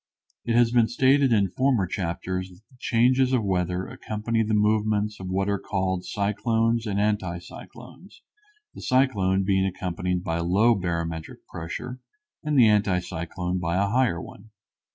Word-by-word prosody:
It 115 0 0
has 120 -1 +4
been 120 -2 +4
stated 135 +2 +3
in 100 -5 +2
former 130 -4 +1
chapters 90 +1 -3
that 90 +1 -17
the 130 - -21
changes 130 +3 +2
of 120 -4 +2
weather 90 -1 -1
accompany 110 +1 -3
the 110 0 0
movements 105 0 +1
of 95 -1 -6
what 95 +1 0
are 100 -1 0
called 95 -2 -2
cyclones 115 +3 0
and 100 -1 -1
anti 105 -4 0
cyclones, 125 - -13 0.5
the - - -10
cyclone 100 -8 +2
being 95 0 +2
accompanied 90 -1 -2
by 80 -1 -2
low 100 +8 +3
barometric 85 -4 -4
pressure 85 +10 -7 0.4
and 150 -2 0
the 120 -3 +7
anti 105 -3 +3
cyclone 90 +1 -4
by 85 -1 -1
a 100 +1 +1
higher 120 -6 +1
one. 100 +5 -11
100 Hz, 155 wpm, -25 LUFS, 90-115 Hz, 0.5 s, the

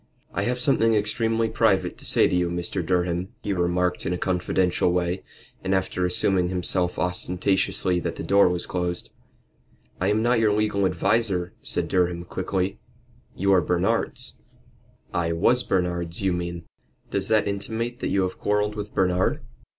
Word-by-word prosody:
"I 100 - -1
have 125 +2 -1
something 115 -5 +3
extremely 115 +2 0
private 110 -3 +1
to - - -11
say - - +4
to - - 0
you, 90 -1 +1
Mr. 85 +1 -3
Durham," 90 +1 0 0.2
he 100 - -1
remarked 90 0 0
in 90 - -1
a - - -1
confidential 90 0 +1
way, 90 +1 0 0.4
and 95 +1 +1
after 95 -1 0
assuring 90 0 +1
himself 90 0 -1
ostentatiously 90 0 0
that - - -3
the - - -6
door 100 -1 +5
was 90 -1 -2
closed. 90 -1 -3 0.9
"I 90 - 0
am 105 +2 +2
not 120 0 +3
your 110 -2 +3
legal 105 -2 +1
adviser," 90 0 +1
said - - -1
Durham, 90 -1 0
quickly. 95 +1 -2 0.6
"You 100 +1 +2
are 90 - +5
Bernard's." 90 +2 -1 0.8
"I 85 -1 0
was 120 +9 +3
Bernard's, 90 -5 -1
you 95 -2 +1
mean." 85 -1 -4 0.5
"Does 100 0 -1
that 110 -2 +3
intimate 115 +4 -3
that - - -2
you 95 - +2
have 95 - -4
quarrelled 105 0 +1
with 105 0 -7
Bernard?" 90 -1 +1
95 Hz, 160 wpm, -25 LUFS, 90-105 Hz, 0.9 s, door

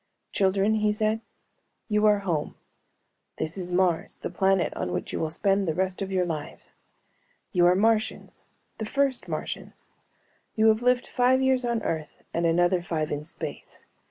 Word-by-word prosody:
"Children," 195 +2 +2
he 210 0 +2
said, 215 +1 0 0.7
"you 210 -1 +3
are 210 -1 +5
home. 160 -5 -1 0.8
This 160 - -2
is 180 -2 -3
Mars, 180 -2 +1
the - - -6
planet 190 0 +2
on 90 - -3
which 90 - -4
you - - -2
will 160 - -1
spend 195 +3 +1
the 160 - 0
rest 190 +1 -1
of 195 0 -3
your 185 -1 +1
lives. 155 -4 -6 0.8
You 175 -1 +4
are 180 - +5
Martians, 220 +2 0 0.4
the 220 - -2
first 275 +2 0
Martians. - - -6 0.7
You 220 0 +5
have 220 +1 +3
lived 250 0 +2
five 255 +1 +3
years 265 -1 +2
on 235 -2 -1
Earth 155 -2 -4
and 170 0 +1
another 175 +2 +3
five 160 -3 -2
in 145 +1 -3
space. 165 - -7
195 Hz, 165 wpm, -26 LUFS, 175-220 Hz, 0.8 s, are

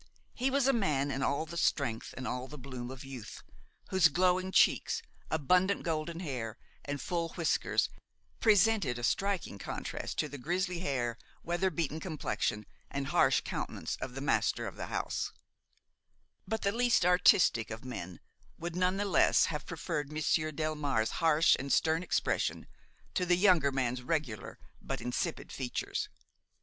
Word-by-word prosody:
He 260 +2 0
was 275 0 +2
a 270 - +5
man 150 - +1
in 135 +1 -2
all 140 +3 0
the 170 +2 -7
strength 135 -8 0
and 130 - -4
all 125 +1 -3
the 150 - -9
bloom 125 -2 -7
of 130 0 -8
youth, 130 -5 -8 0.5
whose 190 -3 +6
glowing 185 +3 +2
cheeks, 460 - +3 0.3
abundant 180 +6 +2
golden 165 +1 -2
hair 120 - -4 0.3
and 145 0 -3
full 170 +4 -2
whiskers 165 -3 +1 0.5
presented 205 - +4
a 120 - -6
striking 195 - 0
contrast - - -5
to - - +1
the 145 - -8
grizzly 180 +5 -1
hair, 120 -8 -1 0.2
weather 175 +3 +1
beaten 160 -2 -2
complexion 110 - -2 0.2
and 140 0 -3
harsh 135 -7 +4
countenance - - -4
of 130 -1 -6
the 135 - -4
master 140 - +1
of - - -6
the - - -5
house; - - -2 1.1
but 220 +2 -2
the 200 - +2
least 240 -4 +3
artistic 180 -9 +5
of 110 +2 -7
men 90 -9 -6 0.4
would 170 +1 -5
none 180 +1 +2
the 205 - 0
less 195 - +4
have 150 - -5
preferred 155 -3 -3
Monsieur 155 +1 +1
Delmare's 145 -7 0
harsh 160 0 +5
and 140 +1 -4
stern 160 +4 +3
expression 180 - 0 0.5
to 180 - +1
the 175 0 +3
younger 180 -7 +5
man's 125 -2 -1
regular 130 -6 -3 0.2
but - - -4
insipid 125 0 -3
features. 125 -2 -3
155 Hz, 155 wpm, -32 LUFS, 130-180 Hz, 1.1 s, whose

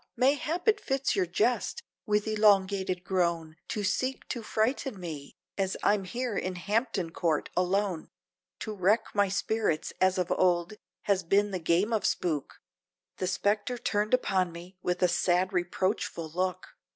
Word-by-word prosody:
Mayhap 295 - +1
it 430 -1 +5
fits 270 -5 0
your 380 -2 +1
jest, 475 - 0 0.2
with 210 0 +1
elongated 195 -4 +3
groan, 170 -4 -1
To 210 - -3
seek 255 +7 -1
to 235 - -3
fright 220 +4 0
me, 160 -6 -7 0.2
as 190 -1 0
I'm 205 -2 +2
here 240 +3 -3
in 185 -1 -2
Hampton 200 -2 -1
Court 165 -3 -1
alone, 185 -1 0 0.5
To 215 - -4
wreck 210 +3 +1
my 205 -1 +3
spirits 200 -4 -1
as 185 0 +4
of 180 -1 -1
old 175 +1 +2 0.3
has 200 -2 +2
been 200 +4 +2
the 185 - -2
game 175 +7 +2
of 220 - +2
spook," 155 -6 -2 0.6
The 185 - -1
spectre 205 +6 0
turned 215 -1 +1
upon 190 -7 0
me 175 +3 -11
with 180 0 -1
a - - +6
sad 180 +2 +1
reproachful 180 -2 -1
look. 185 +2 -2
190 Hz, 150 wpm, -29 LUFS, 180-215 Hz, 0.6 s, a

